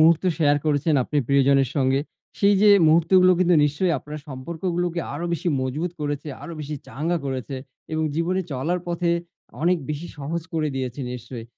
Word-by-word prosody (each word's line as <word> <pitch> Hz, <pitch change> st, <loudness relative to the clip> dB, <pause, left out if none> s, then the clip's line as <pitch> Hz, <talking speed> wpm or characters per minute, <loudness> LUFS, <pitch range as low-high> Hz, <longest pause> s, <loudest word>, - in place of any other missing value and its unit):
মুহূর্ত 165 Hz, +2 st, +5 dB
শেয়ার 145 Hz, -2 st, +4 dB
করেছেন 150 Hz, +1 st, +2 dB
আপনি 145 Hz, +4 st, -1 dB
প্রিয়জনের 140 Hz, -1 st, +4 dB
সঙ্গে, 135 Hz, 0 st, +2 dB, 0.4 s
সেই 200 Hz, 0 st, +5 dB
যে 210 Hz, -, +7 dB, 0.2 s
মুহূর্তগুলো 180 Hz, +3 st, +5 dB
কিন্তু 180 Hz, -1 st, +4 dB
নিশ্চয়ই 160 Hz, +5 st, +1 dB
আপনার 150 Hz, +3 st, -8 dB
সম্পর্কগুলোকে 170 Hz, +5 st, -3 dB
আরো 170 Hz, -, -4 dB
বেশি 170 Hz, +1 st, -1 dB
মজবুত 150 Hz, +7 st, -2 dB
করেছে, 145 Hz, 0 st, -3 dB
আরো 170 Hz, -, -7 dB
বেশি 150 Hz, 0 st, -5 dB
চাঙ্গা 165 Hz, +5 st, -1 dB
করেছে 130 Hz, +1 st, -4 dB, 0.4 s
এবং 155 Hz, 0 st, 0 dB
জীবনে 175 Hz, +4 st, 0 dB
চলার 160 Hz, +8 st, -1 dB
পথে 170 Hz, 0 st, 0 dB, 0.5 s
অনেক 175 Hz, 0 st, +3 dB
বেশি 150 Hz, +3 st, -4 dB
সহজ 160 Hz, +4 st, -3 dB
করে 155 Hz, -1 st, +1 dB
দিয়েছে 130 Hz, +1 st, -3 dB
নিশ্চয়ই। 120 Hz, -1 st, -7 dB
155 Hz, 160 wpm, -23 LUFS, 140-170 Hz, 0.5 s, যে